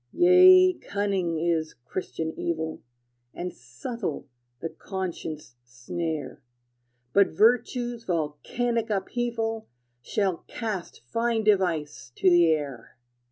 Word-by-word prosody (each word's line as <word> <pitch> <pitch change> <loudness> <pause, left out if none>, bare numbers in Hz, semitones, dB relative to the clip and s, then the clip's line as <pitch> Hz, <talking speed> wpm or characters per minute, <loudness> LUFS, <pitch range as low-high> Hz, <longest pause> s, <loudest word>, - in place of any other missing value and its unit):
Yea, 370 +1 +7
cunning 195 -4 -1
is 165 -1 0
Christian 160 +2 -4
evil, 160 -1 -3 0.5
And 180 +1 -4
subtle 150 - -6 0.3
the 165 - -4
conscience' 160 - -6
snare; 145 +7 -5 0.7
But 200 -1 +6
virtue's 240 +4 +1
volcanic 215 +9 -1
upheaval 225 +2 -2 0.3
Shall 190 - 0
cast 215 -7 -5
fine 230 - 0
device 175 - +1
to 185 - +4
the 175 -1 +6
air! 140 -6 -2
185 Hz, 95 wpm, -26 LUFS, 160-225 Hz, 0.7 s, Yea